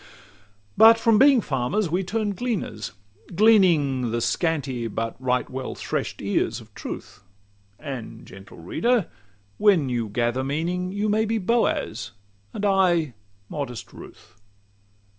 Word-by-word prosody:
XCVI - - -20 0.7
But 225 +1 +8
from 225 -2 +3
being 270 -2 +6
farmers, 155 +6 -1
we 180 +3 +1
turn 210 +2 -1
gleaners, 180 - -4 0.4
gleaning 165 - +4
The 120 +1 -1
scanty 130 0 -1
but 115 +1 -3
right 125 -1 0
well 130 0 -5
thresh'd - - -4
ears 110 +3 0
of 110 -2 -16
truth; - - -8 0.6
And, 125 -6 -8
gentle 95 0 -13
reader! 225 - 0 0.5
when 180 -10 +4
you 120 -3 -2
gather 120 +4 -1
meaning, 170 +6 -2
You 205 +2 -1
may 215 +1 +2
be 225 +1 0
Boaz, 185 - -1 0.4
and 205 - -4
I 175 -7 +2 0.3
modest 135 -4 -6
Ruth. - - -14
150 Hz, 130 wpm, -24 LUFS, -, 0.7 s, But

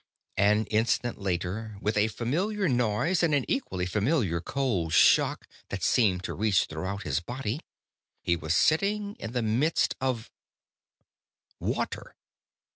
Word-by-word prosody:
An 105 +2 +3
instant 115 +1 0
later, 100 +3 -3
with 105 +1 -1
a 105 +1 +3
familiar 180 - -1
noise 125 - +1
and 160 -4 +3
an 140 - +1
equally 95 - -1
familiar 100 - 0
cold 100 - -1
shock - - +4 0.2
that - - -4
seemed 95 -7 +3
to - - -4
reach 100 -3 +2
throughout 95 +6 -5
his 70 -1 0
body, 120 - -4 0.6
he 85 - +2
was 80 0 -1
sitting 200 - +2
in 110 - -6
the 125 -2 0
midst 125 +9 +1
of 130 -4 -2 1.3
Water. - - -3
110 Hz, 130 wpm, -28 LUFS, 95-135 Hz, 1.3 s, shock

